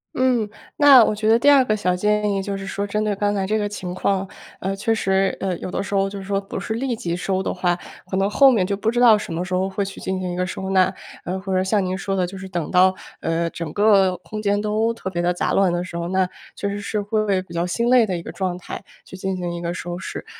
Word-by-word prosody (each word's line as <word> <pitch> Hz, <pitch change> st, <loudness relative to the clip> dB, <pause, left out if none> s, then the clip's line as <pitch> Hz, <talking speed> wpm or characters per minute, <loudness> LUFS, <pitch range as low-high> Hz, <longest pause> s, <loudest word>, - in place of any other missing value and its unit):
嗯， 250 Hz, -4 st, +2 dB, 0.3 s
那 280 Hz, -4 st, +8 dB
我 -, -, +1 dB
觉 215 Hz, +1 st, 0 dB
得 225 Hz, -, +6 dB
第 285 Hz, +5 st, +5 dB
二 275 Hz, -2 st, +6 dB
个 215 Hz, -4 st, 0 dB
小 180 Hz, -3 st, +1 dB
建 210 Hz, +2 st, +1 dB
议 195 Hz, -, 0 dB
就 195 Hz, 0 st, -3 dB
是 195 Hz, -, -7 dB
说， 200 Hz, +1 st, -3 dB
针 210 Hz, +1 st, -1 dB
对 210 Hz, -1 st, 0 dB
刚 205 Hz, +1 st, 0 dB
才 195 Hz, -1 st, 0 dB
这 215 Hz, +3 st, 0 dB
个 205 Hz, -1 st, -1 dB
情 185 Hz, -3 st, -5 dB
况， 195 Hz, +1 st, 0 dB, 0.3 s
呃， 195 Hz, +1 st, -2 dB
确 225 Hz, +3 st, 0 dB
实 195 Hz, -3 st, +1 dB
呃， 190 Hz, -2 st, -1 dB
有 -, -, -5 dB
的 -, -, -2 dB
时 205 Hz, -, -6 dB
候 195 Hz, 0 st, +2 dB
就 200 Hz, -, -7 dB
是 195 Hz, -, -7 dB
说 195 Hz, 0 st, -1 dB
不 195 Hz, -, -6 dB
是 200 Hz, -, -3 dB
立 245 Hz, +2 st, -1 dB
即 170 Hz, -6 st, -3 dB
收 190 Hz, +1 st, -1 dB
的 -, -, -2 dB
话， 180 Hz, -1 st, 0 dB, 0.3 s
可 190 Hz, -, -1 dB
能 195 Hz, +1 st, +2 dB
后 270 Hz, +7 st, +6 dB
面 210 Hz, -7 st, +2 dB
就 200 Hz, -, -1 dB
不 205 Hz, +3 st, -1 dB
知 240 Hz, +1 st, 0 dB
道 240 Hz, -3 st, +7 dB
什 210 Hz, -4 st, -5 dB
么 170 Hz, +2 st, -2 dB
时 185 Hz, -, -5 dB
候 185 Hz, +1 st, +1 dB
会 195 Hz, +1 st, -2 dB
去 195 Hz, -, -8 dB
进 190 Hz, 0 st, -2 dB
行 180 Hz, -1 st, -3 dB
一 -, -, -4 dB
个 180 Hz, 0 st, -1 dB
收 190 Hz, +1 st, -4 dB
纳。 190 Hz, -1 st, +4 dB, 0.3 s
呃， 185 Hz, +2 st, -3 dB
或 190 Hz, 0 st, -3 dB
者 185 Hz, -, +2 dB
像 195 Hz, 0 st, +1 dB
您 185 Hz, 0 st, -1 dB
说 195 Hz, 0 st, -2 dB
的， 185 Hz, -1 st, +1 dB
就 190 Hz, +2 st, -8 dB
是 190 Hz, 0 st, -8 dB
等 175 Hz, -4 st, -3 dB
到， 185 Hz, +1 st, +5 dB, 0.2 s
呃， 165 Hz, +1 st, -1 dB
整 170 Hz, -2 st, -5 dB
个 195 Hz, -3 st, +4 dB
空 215 Hz, +4 st, -7 dB
间 205 Hz, -1 st, +1 dB
都 215 Hz, +2 st, +1 dB
特 190 Hz, -4 st, -5 dB
别 175 Hz, -1 st, -1 dB
地 175 Hz, +1 st, +2 dB
杂 180 Hz, -, -1 dB
乱 195 Hz, -2 st, +3 dB
的 175 Hz, 0 st, -1 dB
时 180 Hz, -1 st, -9 dB
候， 170 Hz, 0 st, -2 dB
那 190 Hz, 0 st, +1 dB, 0.3 s
确 200 Hz, -, -3 dB
实 200 Hz, 0 st, -3 dB
是 210 Hz, +1 st, -2 dB
会 215 Hz, +2 st, 0 dB
为 195 Hz, -2 st, +2 dB
比 175 Hz, -, -13 dB
较 170 Hz, +1 st, -1 dB
心 235 Hz, +7 st, 0 dB
累 250 Hz, -2 st, +6 dB
的 185 Hz, -3 st, -1 dB
一 170 Hz, -, -7 dB
个 -, -, -7 dB
状 185 Hz, -2 st, -2 dB
态 180 Hz, -, -8 dB, 0.2 s
去 -, -, -11 dB
进 190 Hz, 0 st, -3 dB
行 175 Hz, -1 st, -3 dB
一 170 Hz, -, -5 dB
个 170 Hz, 0 st, -2 dB
收 175 Hz, -1 st, -5 dB
拾。 -, -, -6 dB
195 Hz, 315 characters per minute, -22 LUFS, 185-210 Hz, 0.3 s, 那